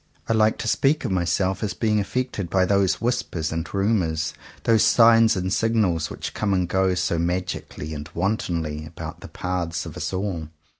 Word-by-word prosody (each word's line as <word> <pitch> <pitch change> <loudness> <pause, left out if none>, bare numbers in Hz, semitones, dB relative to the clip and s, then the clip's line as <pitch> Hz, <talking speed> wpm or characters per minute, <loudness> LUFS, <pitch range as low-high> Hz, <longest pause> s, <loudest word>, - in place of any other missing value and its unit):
I 115 - +2
like 110 0 +3
to - - -4
speak 140 +6 +2
of 115 - -1
myself 95 +1 0
as 105 -2 -2
being 105 -2 +1
affected 105 -3 -2
by 95 +1 +3
those 100 -1 +2
whispers 115 -10 -1
and 80 0 -3
ru 100 +1 +1
mours, 80 -6 0 0.3
those 115 -2 +4
signs 115 -1 +6
and 95 0 -1
signals, 100 -9 +1
which - - -6
come 100 -2 0
and 90 -1 +1
go 95 0 +2
so 85 -1 0
magically 85 -3 -3
and 75 -1 -6
wantonly 85 -5 -1
about 85 +1 -8
the - - -9
paths 90 -3 -3
of - - -8
us - - -3
all. 95 -4 -3
95 Hz, 185 wpm, -24 LUFS, 85-110 Hz, 0.3 s, signs